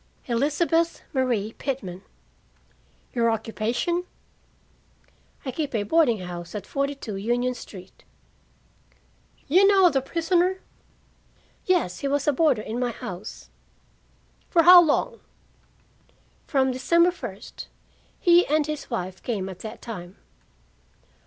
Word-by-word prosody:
"Elizabeth 305 +7 0
Marie 240 -5 0
Pitman." 195 -10 -4 1.1
"Your 230 -1 +2
occupation?" 230 +10 -1 1.4
"I 260 - -2
keep 285 -1 -3
a 210 - 0
boarding 235 - +2
house 175 +1 -7
at 200 -2 -5
42 275 -6 -3
Union 240 +5 0
Street." 190 -6 -12 1.4
"You 370 +7 +5
know 385 -3 +5
the 270 -2 +1
prisoner?" 345 +5 +1 1.1
"Yes. 345 - +1
He 280 - -2
was 280 +1 0
a 295 - +4
boarder 275 -7 +2
in 225 +3 -4
my 250 -1 0
house." 190 -3 -8 1.0
"For 335 -2 +4
how 355 +1 +10
long?" 405 +9 0 1.3
"From 265 -3 +2
December 340 +8 +3
first. 360 - -9 0.5
He 350 0 +5
and 300 +1 +2
his 305 -1 -5
wife 185 -6 -4
came 205 -6 -3
at 185 -1 -9
that 220 - -9
time." 185 -5 -8
260 Hz, 115 wpm, -25 LUFS, 215-330 Hz, 1.4 s, how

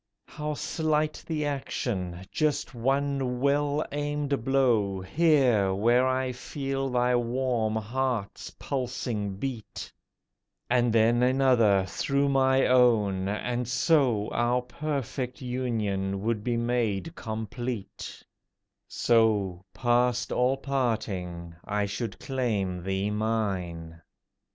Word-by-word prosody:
How 150 0 -4
slight 155 0 -1
the 155 -2 -1
action! 95 -10 -3
Just 155 -4 0
one 135 0 0
well 145 +2 +1
aimed 145 -3 -2
blow 120 -8 +2
Here, 120 - +3
where 120 +5 +3
I 130 0 0
feel 135 +1 -3
thy 125 0 +2
warm 120 -2 0
heart's 115 -1 -2
pulsing 120 -6 -3
beat, 120 0 -6 0.8
And 120 -1 +3
then 115 +2 +4
another 125 -7 +4
through 140 +9 0
my 135 -1 +3
own, 110 -7 +3
and 120 +3 -2
so 125 -5 +2
Our 120 +1 +1
perfect 135 -2 -4
union 110 -7 -2
would 110 -2 -1
be 120 0 0
made 120 - -1
complete: 115 -1 -5 0.6
So, 105 -6 +2
past 120 -1 +1
all 125 +2 +2
parting, 105 -11 -2
I 105 0 -1
should 100 +3 -4
claim 105 -9 -2
thee 95 +2 -1
mine. 95 -7 -2
120 Hz, 105 wpm, -27 LUFS, 105-135 Hz, 0.8 s, then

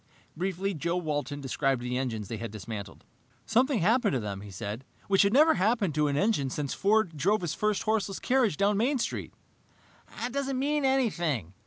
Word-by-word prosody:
Briefly, 190 +3 -2
Joe 170 +2 -1
Walton 145 -4 -3
described 135 -1 0
the 125 0 -2
engines 115 -6 -2
they 115 - -4
had 115 +1 -5
dismantled. 105 -1 -7 0.4
"Something 250 - +2
had 175 - +2
happened 235 -5 +2
to 130 - +1
them," 100 -3 -5
he 105 - -10
said, 100 +5 -6 0.2
"which 195 -1 +4
had 200 - +3
never 305 +6 +6
happened 200 -2 +1
to 150 0 +2
an 140 -1 0
engine 195 -8 +1
since 140 +1 -3
Ford 200 -4 +2
drove 200 +8 +1
his 170 -3 -2
first 210 +2 0
horseless 210 -3 0
carriage 245 - +1
down 200 0 +2
Main 260 +6 +2
Street." 240 - -3 0.9
"It 245 - -4
doesn't 275 -1 -1
mean 290 +2 0
anything!" 175 - 0
180 Hz, 190 wpm, -28 LUFS, 135-220 Hz, 0.9 s, never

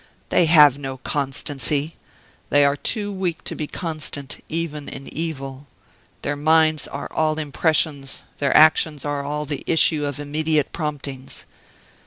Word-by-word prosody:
They 175 - +3
have 150 -4 +7
no 135 -2 -5
constancy 140 +2 -1 0.5
they 145 0 +5
are 140 0 +3
too 205 +6 -2
weak 180 -4 -3
to - - -3
be 150 - -4
constant 155 -5 -5
even 155 -3 -3
in 135 - -8
evil; 140 -4 -5 0.6
their 145 - -1
minds 155 +1 +3
are 140 - -6
all 155 -1 +1
impressions; 150 -2 0 0.2
their 140 - +3
actions 155 -1 +4
are 145 -1 -2
all 150 +1 -3
the 145 0 -5
issue 155 -2 +3
of 145 -1 -4
immediate 150 0 0
promptings. 145 -4 -5
150 Hz, 140 wpm, -22 LUFS, 140-160 Hz, 0.6 s, have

